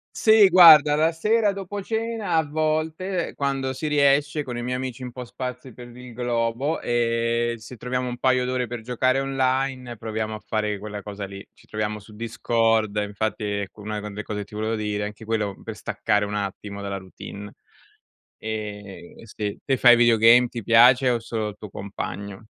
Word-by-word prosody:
Sì, 220 -2 +6
guarda 155 -5 +8
la 160 +2 +2
sera, 210 +5 +2
dopo 200 +1 -6
cena, 225 -2 -2
a 160 - +4
volte 155 +4 -2
quando 135 -2 -1
si 155 +4 -5
riesce, 145 +1 +2
con 125 -4 -6
i 120 - -4
miei 125 +1 -2
amici 130 0 -5
un 125 - -7
po' 125 0 -7
sparsi 125 +1 -7
per 120 +1 -11
il 125 -1 -11
globo, 120 +5 -1
ehm, 115 0 0
se 115 +3 -11
troviamo 125 +2 -3
un 120 0 -5
paio 130 0 +2
d'ore 125 0 -1
per 120 0 -6
giocare 130 +3 0
online, 130 -2 -1
proviamo 110 0 -4
a 110 - -7
fare 105 -1 -2
quella 105 -1 -6
cosa 100 -1 -6
lì. 100 0 -10
Ci - - -23
troviamo 105 0 -3
su 105 +1 -15
Discord, 115 -1 0
infatti 105 +2 -2
ecco, 100 0 -4
una 105 0 -4
delle 105 0 -6
cose 105 -1 -4
che 100 - -6
ti 105 - -15
volevo 110 +1 -1
dire, 105 -1 -2
anche 105 +2 -8
quello 110 -3 -1
per - - -7
staccare 105 -2 0
un 105 - -5
attimo 100 0 -5
dalla 100 0 -4
routine. 100 +2 -10 0.8
Eh, 105 -4 -7
sì. 105 -2 -5
Te 135 - +1
fai 120 -1 +7
videogame? 120 +1 +6
Ti 120 -2 -6
piace, 125 +4 +6
o 120 -1 0
solo 110 -2 -3
il 105 - -14
tuo 105 - -9
compagno? 100 +1 -7
120 Hz, 185 wpm, -24 LUFS, 105-130 Hz, 0.8 s, guarda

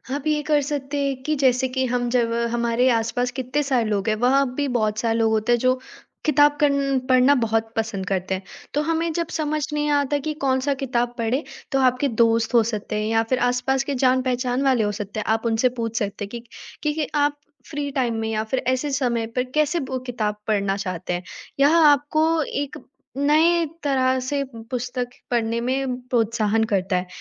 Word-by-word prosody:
आप 290 +1 -4
ये 305 -1 +2
कर 300 -2 +3
सकते 285 0 -3
हैं 275 -1 0
कि 305 +2 0
जैसे 260 -2 +2
कि 260 0 -1
हम 245 -1 -1
जब 235 -2 +1 0.2
हमारे 235 +1 +2
आस-पास 245 +1 0
कितने 260 +4 -1
सारे 260 -5 +1
लोग 200 -1 -1
हैं 215 - +2
वहाँ 260 +5 +3
भी 285 0 0
बहुत 215 -2 +1
सारे 230 0 0
लोग 225 -1 +2
होते 220 +2 +1
हैं 240 - +4
जो 255 +2 +3 0.5
किताब 290 0 +4
कन्न 280 -2 +2
पढ़ना 255 +2 +5
बहुत 225 0 0
पसंद 220 -4 -2
करते 190 -1 -1
हैं। 190 - -7 0.3
तो 295 - +1
हमें 330 +1 0
जब 335 0 -1
समझ 305 -1 -1
नहीं 295 0 0
आता 290 0 +2
कि 305 +2 -3
कौन-सा 265 +1 +1
किताब 245 -3 -1
पढ़े, 235 +5 0 0.3
तो 270 - +2
आपके 255 +1 +2
दोस्त 230 0 +2
हो 235 -2 +6
सकते 215 -2 -4
हैं 215 - -1
या 225 0 +2
फिर 255 - +1
आसपास 250 +2 +1
के 280 0 -3
जान-पहचान 255 0 +1
वाले 260 -5 +3
हो 205 - 0
सकते 210 0 -5
हैं, - - -4
आप 225 +1 +1
उनसे 230 +2 +2
पूछ 230 0 -2
सकते 205 -1 -3
हैं - - -13 0.5
कि 300 - +1
कि 305 -1 -2
आप 290 0 +2 0.3
फ़्री 290 -1 -3
टाइम 250 -4 0
में 220 0 -2
या 215 -1 -1
फिर 220 +4 -1
ऐसे 260 +3 0
समय 245 -4 0
पे 250 - +2
कैसे 305 +6 0
वो 260 -2 -3
किताब 215 -4 -1
पढ़ना 200 -2 +1
चाहते 185 -2 -4
हैं? 175 +1 -3 0.4
यह 285 +4 +5
आपको 310 +1 +4
एक 285 -1 -4 0.4
नए 320 +4 +3 0.2
तरह 260 -2 +2
से 275 +2 -1 0.3
पुस्तक 250 0 -3 0.2
पढ़ने 230 -1 0
में 260 +1 -1
प्रोत्साहन 225 -2 +1
करता 190 -1 +1
है। 180 0 -1
255 Hz, 200 wpm, -23 LUFS, 225-280 Hz, 0.5 s, हो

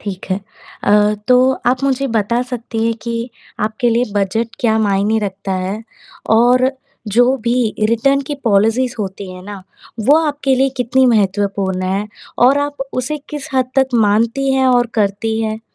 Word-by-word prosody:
ठीक 195 -3 -6
है। 185 - +2 0.5
अ, 210 +1 +4
तो 255 +1 +5
आप 255 +2 +2
मुझे 275 0 0
बता 230 +3 +1
सकती 240 -2 -4
हैं 230 0 +1
कि 235 +1 -4 0.3
आपके 220 +3 -1
लिए 235 +2 +2
बजट 205 +3 0
क्या 220 -3 +2
मायने 205 +1 +1
रखता 195 -1 -4
है? 190 +3 -3 0.5
और 250 +3 +4 0.4
जो 245 +3 +4
भी 235 - +2 0.3
रिटर्न 275 +5 +2
की 295 - -3
पॉलिसीज़ 225 +4 +2
होती 195 -1 -5
हैं 180 0 -10
ना, 200 -1 -9 0.4
वो 275 +8 +5
आपके 285 -2 0
लिए 265 +1 +2
कितनी 255 +2 +2
महत्वपूर्ण 200 -3 0
हैं 195 +3 -2 0.4
और 275 +3 +4
आप 285 0 -3
उसे 255 +4 -2
किस 295 0 -6
हद 255 -1 +1
तक 265 -1 +4
मानती 230 +5 +2
हैं 265 0 +2
और 245 -1 +3
करती 220 +1 0
हैं? 220 0 -3
230 Hz, 165 wpm, -17 LUFS, 205-255 Hz, 0.5 s, तो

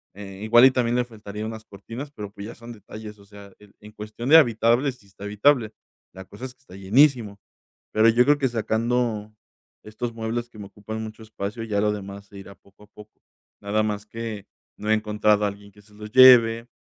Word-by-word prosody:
eh, 95 -1 -10
igual 120 +2 +5
y 135 - +7
también 120 -2 0
le 125 - +2
faltaría 105 -3 -8
unas 110 0 -7
cortinas, 115 +9 -9
pero, 105 -6 -8
pues, 100 0 -9
ya - - -10
son 120 0 -11
detalles, 105 -1 -11
o 100 - -18
sea, 100 -1 -14
en 105 -1 -20
en 105 0 -13
cuestión 110 +5 -7
de 160 - +9
habitable, 120 0 +3
sí 125 -5 -23
está 100 +1 -12
habitable. 110 +2 +2 0.4
La 95 - -9
cosa 100 +7 -10
es 130 0 -9
que - - -44
está 95 - -15
llenísimo, 110 +1 +2 0.6
pero 110 +1 +4
yo 120 +2 +4
creo 145 0 +4
que 135 - +1
sacando 115 -1 -2 0.5
estos 110 +2 -6
muebles 115 +1 -4
que 115 - -17
me 105 - -8
ocupan 110 +2 -7
mucho 110 0 -9
espacio, 110 +1 -6
ya 105 -2 -1
lo 105 0 +1
demás 100 -1 -8
se 100 - -14
irá 100 0 -12
poco 100 +1 -23
a - - -30
poco. 105 0 -16 0.5
Nada 105 +2 0
más 105 -1 -3
que 110 -2 -7 0.3
no 105 - -5
he 110 - +5
encontrado 105 -1 +1
a 100 - +1
alguien 100 0 -13
que 105 +1 -20
se 105 +1 -24
los 105 0 -11
lleve, 120 -3 +7
110 Hz, 220 wpm, -23 LUFS, 105-115 Hz, 0.6 s, de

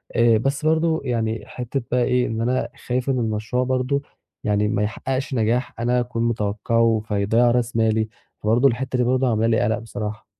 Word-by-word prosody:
آآ 115 -2 +5
بس 135 +5 -1
برضه 160 0 +2
يعني 115 -3 -1
حتّة 125 +2 -4
بقى 125 0 +3
إيه، 125 0 +2
إن 115 0 -3
أنا 125 +2 0 0.2
خايف 125 +2 -1
إن 130 -2 +1
المشروع 110 +2 -1
برضه 130 +2 0 0.4
يعني 105 0 +1
ما 105 -1 0
يحقّقش 130 +5 -3
نجاح 120 +1 0
أنا 125 +1 +1
أكون 120 -1 -2
متوقَّعه 115 0 +1
فيضيع 110 +4 +2
راس 120 0 0
مالي، 110 -1 +2 0.3
فبرضه 115 +6 +3
الحتّة 130 +1 -1
دي 125 - +2
برضه 130 +1 +2
عاملة 110 0 +1
لي 115 -1 +2
قَلَق 110 +2 +1
بصراحة. 105 -1 -6
120 Hz, 180 wpm, -22 LUFS, 110-125 Hz, 0.4 s, آآ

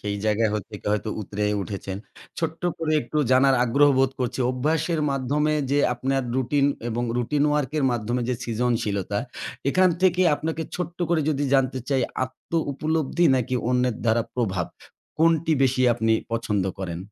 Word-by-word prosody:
সেই 100 0 -3
জায়গায় 110 0 +2
হইৎ 105 0 -6
হয়তো 105 +1 -1
উতরায়ে 105 +1 -2
উঠেছেন। 95 +1 -5 0.4
ছোট্ট 165 0 -3 0.2
করে 160 -1 -1
একটু 135 +6 -3
জানার 135 +1 +5
আগ্রহ 140 +5 +4
বোধ 135 0 +3
করছি। 125 +1 -2
অভ্যাসের 155 +5 0
মাধ্যমে 145 +3 0 0.2
যে 145 - +3 0.2
আপনার 135 +2 -1
রুটিন 140 +2 +2 0.2
এবং 120 +1 -2
রুটিন 140 +4 0
ওয়ার্ক 150 -3 0
এর 140 - +1
মাধ্যমে 120 +2 -1
যে 125 - +1
সৃজনশীলতা, 115 -5 -1 0.5
এখান 185 +2 +4
থেকে 185 -1 +4
আপনাকে 160 +2 -3
ছোট্ট 180 -1 -5
করে 170 -2 +2
যদি 145 -1 0
জানতে 130 -1 +2
চাই 135 -2 +2 0.2
আত্মউপলব্ধি 155 +3 -1
নাকি 125 0 -1 0.2
অন্যের 125 -2 +1
দ্বারা 115 +1 +3
প্রভাব? 95 -8 -1 0.5
কোনটি 165 0 +3
বেশি 130 0 +2
আপনি 115 -1 +1 0.2
পছন্দ 105 -4 0
করেন? 85 -3 -4
130 Hz, 150 wpm, -24 LUFS, 115-150 Hz, 0.5 s, জানার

